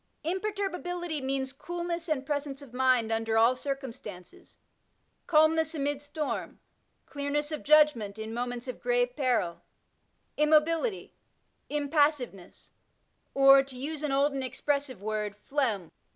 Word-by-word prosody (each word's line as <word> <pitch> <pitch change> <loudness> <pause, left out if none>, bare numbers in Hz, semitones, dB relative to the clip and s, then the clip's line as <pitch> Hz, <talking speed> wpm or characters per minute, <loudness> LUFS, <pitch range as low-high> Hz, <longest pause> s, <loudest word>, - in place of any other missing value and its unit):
Imperturbability 355 -3 -3
means 265 0 -2
coolness 345 +3 -4
and 275 -4 -1
presence 285 -1 -3
of 250 -4 -15
mind 250 -3 +3
under 225 0 0
all 230 +3 +5
circumstances, 255 -9 -7 0.7
calmness 320 0 +3
amid 285 -1 -1
storm, 290 +1 -4 0.5
clearness 295 +1 -2
of 305 - -3
judgment 290 -9 +4
in 220 0 -6
moments 245 +1 -4
of 255 - -6
grave 245 0 +1
peril, 240 - 0 0.8
immobility, 315 +7 +2 0.6
impassiveness, 290 - 0 0.6
or, 275 0 +8
to 270 -2 -8
use 295 +3 -4
an 300 -2 -1
old 280 +1 +2
and 270 -1 -2
expressive 270 -4 -2
word, 210 -1 -2
phlegm. 215 - -1
275 Hz, 120 wpm, -29 LUFS, 245-305 Hz, 0.8 s, or